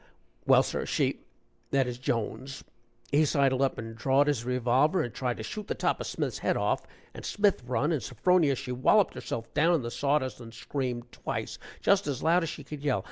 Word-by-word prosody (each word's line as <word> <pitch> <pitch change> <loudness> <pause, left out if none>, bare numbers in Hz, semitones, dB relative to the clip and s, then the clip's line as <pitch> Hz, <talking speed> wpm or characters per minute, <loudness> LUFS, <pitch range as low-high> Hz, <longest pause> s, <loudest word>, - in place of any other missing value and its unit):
"Well, - - +6
sir, - - -3
she - - 0 0.5
that 135 -1 +2
is, 125 0 -5
Jones 130 +1 -3 0.5
he 150 +2 +4
sidled 135 -3 +2
up 135 - +1
and 115 0 -6
drawed 135 +5 +3
his 145 -6 0
revolver 125 +7 +2
and 120 - -5
tried 125 -2 -2
to 110 - -6
shoot 210 - -6
the - - -2
top - - 0
of - - -4
Smith's - - -3
head - - +1
off, - - 0 0.3
and - - -9
Smith 205 -6 +1
run, 130 +6 +1
and 155 -5 0
Sophronia 150 +4 +2
she 125 - -6
walloped 135 +11 +3
herself 115 0 -6
down 165 +4 +4
in 155 - 0
the 120 - -4
saw 145 +3 +2
dust 130 -6 -4
and 115 -1 -11
screamed 125 -2 -4
twice, - - -5 0.2
just 200 0 +3
as 140 -4 -3
loud 170 +3 +4
as 165 - -2
she 145 - -7
could 145 +1 -8
yell. 140 -7 +1
135 Hz, 210 wpm, -29 LUFS, 120-150 Hz, 0.5 s, Well